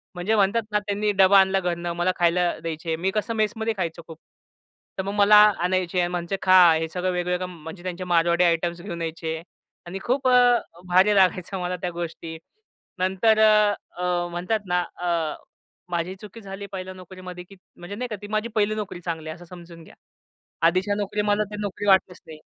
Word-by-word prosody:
म्हणजे 185 +5 0
म्हणतात 205 +3 +2
ना, 210 - +2
त्यांनी 205 0 -1
डबा 195 0 +6
आणला 190 0 +3
घरनं, 175 -1 -3
मला 175 +2 +1
खायला 175 0 +2
द्यायचे. 160 0 -4
मी 185 +4 -1
कसं 215 +3 -2
मेसमध्ये 220 +1 -1
खायचो 170 -2 -3
खूप. 160 -1 -10 0.8
तर 190 - -2
मग 200 +1 -4
मला 205 +1 +6 0.2
आणायचे 180 0 0
आणि 175 - +2
म्हणायचे 175 +2 -3
खां, 180 -3 +6
हे 160 - -2
सगळं 180 +2 -2
वेगवेगळं 180 0 -1
म्हणजे 165 +1 -10
त्यांचे 185 0 -5
मारवाडी 170 0 +2
आयटम्स 170 0 0
घेऊन 170 -3 -6
यायचे 160 0 -4 0.4
आणि 190 +3 -6
खूप 260 +2 0
अ, 245 -1 +5 0.3
भारी 185 +4 +4
लागायचं 185 0 +2
मला 180 0 -2
त्या 180 - -2
गोष्टी. 165 -1 -6 0.6
नंतर 190 +4 +2
अ, 205 -5 +2
म्हणतात 180 +6 -1
ना 180 0 +1
अ, 170 -3 -1 0.5
माझी 175 +2 -2
चुकी 215 +2 -11
झाली 195 0 -8
1ल्या 185 -1 -6
नोकरीमध्ये 185 -1 -10
की 195 +2 -16 0.2
म्हणजे 175 +4 -8
नाही 250 +3 -4
का 215 - -3
ती 205 - -8
माझी 215 +2 -1
1हिली 215 0 +1
नोकरी 210 -4 -5
चांगली 160 -2 -5
आहे 155 - -5
असं 175 0 -14
समजून 170 -1 -13
घ्या. - - -17 0.7
आधीच्या 185 +4 +1
नोकरी 210 +1 -2
मला 205 0 +1
ती 210 - -6
नोकरी 205 0 -4
वाटलीच 190 -2 +3
नाही. 155 -1 -11
185 Hz, 185 wpm, -24 LUFS, 175-205 Hz, 0.8 s, डबा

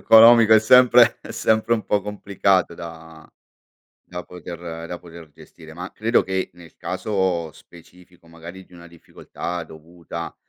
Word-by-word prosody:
economico 115 0 +7
è 110 - +6
sempre 125 +1 +5
è - - -10
sempre 110 +1 0
un 110 - -5
po' 105 - 0
complicato 100 -3 -1
da 80 -1 -12 0.8
da 90 0 -8
poter 85 -2 -9
da 90 - -6
poter 85 -2 -14
gestire; 80 +2 -16
ma 90 +3 -8
credo 115 +2 +1
che, 95 0 -3
nel 85 -2 -17
caso 95 -6 -3
specifico, 90 +1 -19
magari, 85 +3 -12
di 90 - -28
una 85 -1 -14
difficoltà 85 +1 -8
dovuta 85 +1 -10
90 Hz, 145 wpm, -21 LUFS, 85-105 Hz, 0.8 s, economico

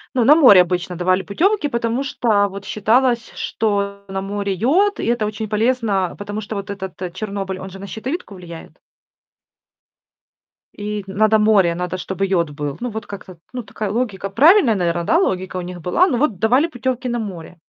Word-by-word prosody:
Ну, 250 - +3
на 295 +5 +8
море 250 - +8
обычно 180 0 -2
давали 185 +2 +1
путёвки, 385 - +1
потому 235 +1 -1
что 215 -7 +1
вот 200 0 -9
считалось, 235 +2 +1
что 200 -2 -2
на 195 0 -4
море 200 0 -3
йод, 355 - +2
и - - -2
это 235 -2 +1
очень 215 0 -4
полезно, 215 -4 0
потому 205 +1 -5
что 215 0 -6
вот 200 0 -5
этот 190 -3 -6
Чернобыль, 195 -2 -4
он 190 0 -8
же 195 - -10
на 200 - -8
щитовидку 250 - -5
влияет. 170 -2 -11 2.0
И 210 0 -4
надо 215 +3 +3
море, 205 -5 +3
надо, 180 +1 -3
чтобы 190 +1 -3
йод 175 -5 +1
был. 145 -1 -5
Ну, 245 - -3
вот 220 0 -6
как-то 190 -3 -10 0.2
ну, 250 - -3
такая 210 -1 -5
логика. 210 -4 -2
Правильная, 285 - +5
наверное, 175 -2 0
да, 325 - +3
логика 185 - -1
у - - -2
них 175 -1 -8
была. 255 - +3
Но 255 - 0
вот 235 -8 0
давали 250 - +3
путёвки 255 -3 -3
на 240 -1 -1
море. 180 -6 -7
205 Hz, 185 wpm, -20 LUFS, 190-235 Hz, 2.0 s, на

